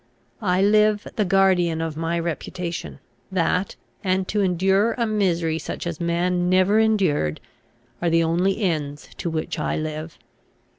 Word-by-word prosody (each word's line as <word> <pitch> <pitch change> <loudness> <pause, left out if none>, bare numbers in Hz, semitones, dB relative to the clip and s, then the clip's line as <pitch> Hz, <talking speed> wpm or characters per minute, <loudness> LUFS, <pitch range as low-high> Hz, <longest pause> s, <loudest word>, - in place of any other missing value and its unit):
I 185 -2 +2
live 210 0 +3
the 210 - +1
guardian 180 -3 +3
of 165 -2 -3
my 165 +2 -1
reputation. 170 - -4 0.3
That, 185 +1 0 0.3
and 185 -1 0
to 210 - +1
endure 190 +4 +2
a 235 - -1
misery 175 -7 0
such - - -6
as 170 -1 -4
man 175 +1 0
never 185 +3 +4
endured, 185 - +1 0.6
are 175 - +2
the 165 0 +3
only 180 +6 +1
ends 150 -5 -2
to 175 - -2
which 160 -1 -3
I - - -1
live. 155 +1 -5
180 Hz, 145 wpm, -23 LUFS, 165-195 Hz, 0.6 s, never